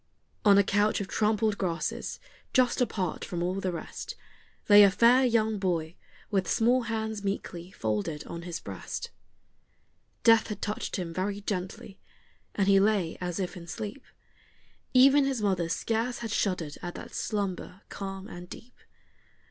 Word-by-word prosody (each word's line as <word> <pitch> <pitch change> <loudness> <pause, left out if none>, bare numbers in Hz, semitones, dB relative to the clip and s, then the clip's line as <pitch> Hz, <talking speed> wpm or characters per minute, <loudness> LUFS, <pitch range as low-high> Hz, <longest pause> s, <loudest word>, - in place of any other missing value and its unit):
On 200 -2 +7
a 200 - +6
couch 205 +2 +2
of 200 - -3
trampled 215 0 +1
grasses, 170 -4 -2 0.3
just 255 0 +3
apart 195 -7 -1
from 175 -1 -3
all 185 +2 -1
the 185 - -1
rest, 165 -2 -6 0.5
Lay 205 0 +9
a 200 - +8
fair 235 +6 +5
young 220 -3 +2
boy, 170 -4 -1 0.4
with 195 -2 +1
small 245 +3 +3
hands 220 -2 -3
meekly 185 -3 -4
folded 115 - -3
on 170 - -6
his 170 -1 -5
breast. - - -6 1.1
Death 225 -1 +6
had 210 -3 -5
touched 210 0 -3
him 175 -4 -4
very 200 +3 -2
gently, 195 0 -5 0.6
and 195 -2 +1
he 195 -1 +6
lay 200 -5 +2
as 175 0 -3
if 185 -1 -3
in 170 -2 -9
sleep; 210 +8 -6 0.9
Even 275 +3 +7
his 270 -3 0
mother 190 -5 0
scarce 230 +7 -1
had 230 -2 -5
shuddered 180 -8 -1
at 175 -1 -6
that - - -9
slumber 200 -2 -3
calm 195 0 -6
and 175 -3 -9
deep. 245 +2 -11
200 Hz, 155 wpm, -28 LUFS, 180-220 Hz, 1.1 s, Lay